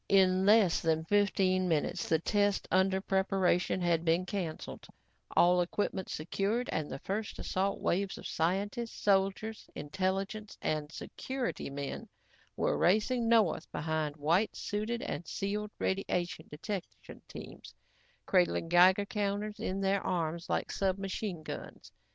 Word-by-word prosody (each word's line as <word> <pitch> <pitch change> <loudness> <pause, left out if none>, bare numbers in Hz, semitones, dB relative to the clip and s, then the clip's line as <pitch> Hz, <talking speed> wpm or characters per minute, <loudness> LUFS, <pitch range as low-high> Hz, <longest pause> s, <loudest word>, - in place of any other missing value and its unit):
In 190 -1 +4
less 210 -5 +5
than 160 -1 +1
fifteen 190 -2 +2
minutes, 165 +1 0
the 160 - +4
test 205 +4 +1
under 190 +1 +3
preparation 190 -2 +1
had 170 -2 +2
been 170 +2 +2
canceled, 185 -5 -5 0.5
all 180 +1 +6
equipment 190 +1 -2
secured 200 +9 -1
and 155 -1 -2
the 135 - -4
first 205 +8 -4
assault 195 +2 -1
waves 195 +2 0
of - - -10
scientists, 200 +8 -1
soldiers, 195 +2 +1
intelligence 195 +6 -3
and 150 -1 -2
security 260 - -4
men 140 0 -5 0.5
were - - +1
racing 225 +5 +2
north 225 -7 +3
behind 155 -1 -2
white 170 +8 +2
suited 215 +3 -3
and 175 - -4
sealed 210 +2 -2
radiation 180 -4 -1
detection 190 +6 -7
teams - - -10 0.5
cradling 180 -3 +2
Geiger 185 +3 +6
counters 205 0 -2
in 190 +1 -2
their 195 0 +2
arms 170 -1 -2
like - - -1
submachine 195 -2 -2
guns. - - -8
190 Hz, 125 wpm, -32 LUFS, 170-205 Hz, 0.5 s, all